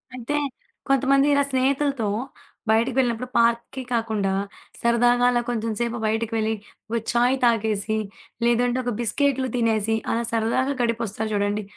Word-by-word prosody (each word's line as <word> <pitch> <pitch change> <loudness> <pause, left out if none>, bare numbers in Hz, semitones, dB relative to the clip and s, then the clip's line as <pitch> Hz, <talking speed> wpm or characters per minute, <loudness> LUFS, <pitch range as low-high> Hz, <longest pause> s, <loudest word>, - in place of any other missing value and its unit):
అయితే 255 +4 -3 0.5
కొంతమంది 275 +1 +4
ఇలా 285 - +4
స్నేహితులతో 270 -2 +1 0.6
బయటికి 230 +3 +2
వెళ్ళినప్పుడు 250 -1 +1
పార్క్‌కి 235 +3 +1
కాకుండా, 220 -4 0 0.5
సరదాగా 240 +1 +3
అలా 240 0 +2
కొంచెంసేపు 235 +1 -2
బయటికి 225 +1 -1
వెళ్ళి 220 0 0 0.4
ఒక 235 - +1
ఛాయ్ 245 +2 +3
తాగేసి, 220 -2 +1 0.5
లేదంటే 240 +1 +2
ఒక 245 - -1
బిస్కెట్లు 265 +2 +1
తినేసి, 225 -2 +1 0.2
అలా 235 +1 0
సరదాగా 230 +5 +1
గడిపొస్తారు 225 -2 -1
చూడండి, 205 +1 0
235 Hz, 120 wpm, -24 LUFS, 220-250 Hz, 0.6 s, కొంతమంది